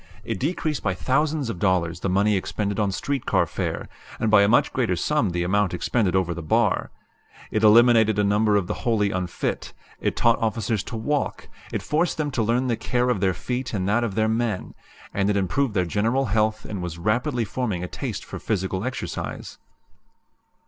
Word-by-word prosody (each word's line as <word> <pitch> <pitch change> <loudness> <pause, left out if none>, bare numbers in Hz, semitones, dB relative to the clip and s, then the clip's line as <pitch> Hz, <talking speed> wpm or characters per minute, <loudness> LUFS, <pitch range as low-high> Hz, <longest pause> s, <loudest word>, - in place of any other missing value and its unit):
It - - -4
decreased 155 0 -1
by 95 -3 -1
thousands 145 - 0
of 90 - -7
dollars 90 -3 +1
the 95 - -2
money 100 +3 +3
expended 100 +1 -2
on 100 -2 +1
street 135 +6 -3
car - - +3
fare, - - -4 0.3
and 110 - +1
by 105 -2 +7
a 100 - +4
much 120 +4 +3
greater 115 -8 +1
sum 125 - +1
the 85 0 -1
amount 95 0 +1
expended 95 +1 0
over 90 -2 +1
the 85 - -6
bar. 75 - +1 0.6
It 110 - 0
eliminated 110 -1 +6
a 105 - +3
number 105 +1 +3
of 100 -3 +2
the - - -2
wholly 110 -5 +1
unfit; 90 -2 -3 0.3
it - - -1
taught 115 -1 +3
officers 110 -1 0
to - - -6
walk; 145 +6 -2 0.2
it - - -3
forced 160 +3 0
them 150 -2 -1
to 125 - -1
learn 120 +4 +1
the 120 -2 +1
care 125 0 0
of 105 - 0
their 95 -2 +2
feet 125 -2 -3
and 95 -1 -1
that 120 +3 +2
of 110 -5 -2
their 110 0 +2
men; 110 -3 -1 0.4
and 100 0 +1
it 100 - +2
improved 105 +5 0
their 90 -2 +2
general 115 +9 +1
health 110 0 0
and 100 -3 -5
was 85 -2 -5
rapidly 115 - 0
forming 105 -5 -2
a - - -3
taste - - -5
for - - -7
physical 95 -2 -2
exercise." 130 +1 -5
110 Hz, 195 wpm, -24 LUFS, 95-120 Hz, 0.6 s, by